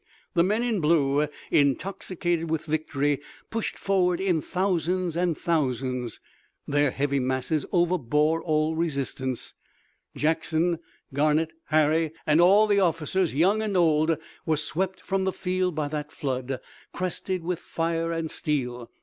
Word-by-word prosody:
The 170 Hz, -3 st, +4 dB
men 210 Hz, +6 st, +1 dB
in 230 Hz, -4 st, 0 dB
blue, 150 Hz, -2 st, +3 dB, 0.2 s
intoxicated 170 Hz, +2 st, 0 dB
with 155 Hz, -1 st, -1 dB
victory, 145 Hz, -2 st, 0 dB, 0.3 s
pushed 225 Hz, 0 st, -2 dB
forward 180 Hz, -3 st, +1 dB
in 185 Hz, -5 st, +1 dB
thousands 180 Hz, -1 st, 0 dB
and 175 Hz, -2 st, +1 dB
thousands. 130 Hz, -6 st, -1 dB, 0.5 s
Their 145 Hz, 0 st, +3 dB
heavy 140 Hz, +1 st, 0 dB
masses 130 Hz, +3 st, -1 dB
overbore 165 Hz, -3 st, +2 dB
all 155 Hz, 0 st, +1 dB
resistance. 135 Hz, -5 st, -2 dB, 0.6 s
Jackson, 160 Hz, +2 st, +1 dB, 0.3 s
Garnett, 155 Hz, +3 st, +2 dB
Harry 155 Hz, +1 st, +2 dB
and 155 Hz, +2 st, +4 dB
all 200 Hz, +5 st, +6 dB
the 205 Hz, -1 st, +3 dB
officers, 170 Hz, -1 st, +1 dB
young 195 Hz, +8 st, +3 dB
and 210 Hz, -3 st, 0 dB
old 160 Hz, -2 st, +3 dB, 0.3 s
were 160 Hz, -2 st, +1 dB
swept 185 Hz, +5 st, -2 dB
from 190 Hz, 0 st, -1 dB
the 190 Hz, -, +1 dB
field 185 Hz, -2 st, -1 dB
by 155 Hz, -1 st, -1 dB
that 150 Hz, 0 st, -4 dB
flood, 130 Hz, -1 st, -3 dB, 0.3 s
crested 185 Hz, 0 st, -2 dB
with 175 Hz, 0 st, -2 dB
fire 165 Hz, -1 st, -2 dB
and 165 Hz, -1 st, -2 dB
steel. 125 Hz, -5 st, -2 dB
160 Hz, 130 wpm, -26 LUFS, 145-180 Hz, 0.6 s, all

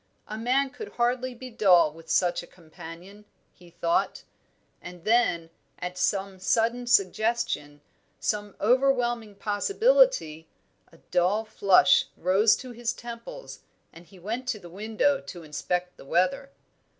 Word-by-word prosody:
A 215 Hz, -, -6 dB
man 260 Hz, +5 st, +1 dB
could 430 Hz, +9 st, -9 dB
hardly 245 Hz, +1 st, 0 dB
be 255 Hz, +1 st, -9 dB
dull 180 Hz, -9 st, +4 dB
with 165 Hz, 0 st, -15 dB
such 175 Hz, -1 st, +2 dB
a 175 Hz, -, -13 dB
companion, 175 Hz, +4 st, -12 dB, 0.3 s
he 175 Hz, -1 st, -18 dB
thought; 170 Hz, 0 st, -1 dB, 0.6 s
and 175 Hz, -1 st, -11 dB
then, 175 Hz, -8 st, +2 dB, 0.3 s
at 180 Hz, 0 st, -5 dB
some 195 Hz, +1 st, -1 dB
sudden 235 Hz, +5 st, +1 dB
suggestion, 215 Hz, -9 st, 0 dB, 0.4 s
some 205 Hz, -1 st, -2 dB
overwhelming 240 Hz, -2 st, +1 dB
possibility, 400 Hz, -, +2 dB, 0.4 s
a 165 Hz, -, -18 dB
dull 185 Hz, +5 st, +2 dB
flush 195 Hz, -4 st, +4 dB
rose 195 Hz, +5 st, +4 dB
to 255 Hz, -1 st, -9 dB
his 240 Hz, 0 st, -3 dB
temples, 240 Hz, -, -9 dB, 0.3 s
and 170 Hz, +1 st, -15 dB
he 195 Hz, -, -17 dB
went 225 Hz, +8 st, -5 dB
to 250 Hz, -4 st, -1 dB
the 175 Hz, -3 st, -13 dB
window 220 Hz, +8 st, 0 dB
to 175 Hz, -3 st, -10 dB
inspect 180 Hz, +4 st, -3 dB
the -, -, -14 dB
weather. 185 Hz, -, 0 dB
210 Hz, 135 wpm, -26 LUFS, 175-240 Hz, 0.6 s, dull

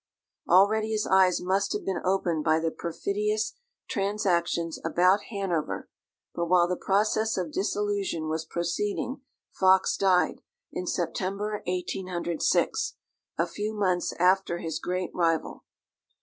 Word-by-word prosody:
Already 215 Hz, +4 st, +4 dB
his 210 Hz, -1 st, 0 dB
eyes 190 Hz, -2 st, +4 dB
must 190 Hz, +2 st, 0 dB
have -, -, -4 dB
been 190 Hz, -3 st, -1 dB
opened 180 Hz, -4 st, 0 dB
by 155 Hz, 0 st, +3 dB
the 165 Hz, 0 st, -1 dB
perfidious 210 Hz, +7 st, -2 dB, 0.3 s
transactions 180 Hz, -6 st, 0 dB
about 180 Hz, +5 st, +3 dB
Hanover; 195 Hz, -7 st, -2 dB, 0.4 s
but 170 Hz, 0 st, -2 dB
while 175 Hz, 0 st, +4 dB
the 180 Hz, -, -1 dB
process 215 Hz, +4 st, +1 dB
of 175 Hz, -4 st, -2 dB
disillusion 200 Hz, -4 st, -1 dB
was 160 Hz, 0 st, -2 dB
proceeding, 190 Hz, -, -2 dB, 0.3 s
Fox 190 Hz, 0 st, +4 dB
died, 185 Hz, -2 st, +2 dB, 0.3 s
in 180 Hz, -, -4 dB
September 195 Hz, +5 st, -2 dB
1806, 180 Hz, -2 st, -1 dB, 0.4 s
a 170 Hz, -, +2 dB
few 210 Hz, +5 st, -4 dB
months 185 Hz, -4 st, +1 dB
after 180 Hz, 0 st, +2 dB
his 165 Hz, -2 st, -4 dB
great 180 Hz, 0 st, -2 dB
rival. 165 Hz, -2 st, 0 dB
185 Hz, 120 wpm, -27 LUFS, 170-200 Hz, 0.4 s, Already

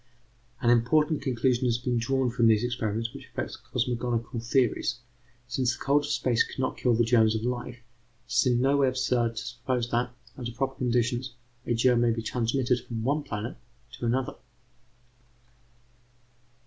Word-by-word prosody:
An 120 Hz, -, +4 dB
important 150 Hz, +6 st, +3 dB
conclusion 125 Hz, 0 st, +1 dB
has 120 Hz, -2 st, +2 dB
been 120 Hz, 0 st, -1 dB
drawn 130 Hz, +1 st, +1 dB
from 120 Hz, -1 st, +3 dB
these 110 Hz, 0 st, +4 dB
experiments 115 Hz, -2 st, -2 dB
which -, -, -10 dB
affects -, -, -5 dB
cosmogonical 120 Hz, -1 st, -2 dB
theories: 125 Hz, 0 st, +1 dB, 0.5 s
since 120 Hz, 0 st, 0 dB
the -, -, -20 dB
cold 145 Hz, +2 st, +2 dB
of -, -, -6 dB
space 125 Hz, -5 st, +2 dB
could -, -, -10 dB
not 130 Hz, -1 st, -1 dB
kill 125 Hz, -2 st, +2 dB
the 120 Hz, -, +3 dB
germs 115 Hz, -2 st, +4 dB
of 110 Hz, -, -2 dB
life, 125 Hz, 0 st, -3 dB
it 120 Hz, 0 st, -17 dB
is 120 Hz, +2 st, +4 dB
in 120 Hz, -1 st, +3 dB
no 135 Hz, +2 st, +3 dB
way 140 Hz, -1 st, +4 dB
absurd 125 Hz, -2 st, +1 dB
to 110 Hz, -, -5 dB
suppose 120 Hz, 0 st, -2 dB
that, 120 Hz, +1 st, +1 dB, 0.3 s
under 120 Hz, -2 st, -5 dB
proper 135 Hz, +3 st, -1 dB
conditions, 125 Hz, 0 st, -1 dB, 0.3 s
a 120 Hz, -, +1 dB
germ 120 Hz, +1 st, +3 dB
may 120 Hz, -, +3 dB
be 115 Hz, -1 st, -1 dB
transmitted 125 Hz, +2 st, 0 dB
from 115 Hz, -2 st, -5 dB
one 145 Hz, +5 st, +1 dB
planet 115 Hz, -4 st, -5 dB, 0.3 s
to 120 Hz, -1 st, -4 dB
another. 125 Hz, +2 st, -1 dB
120 Hz, 170 wpm, -27 LUFS, 115-130 Hz, 0.5 s, An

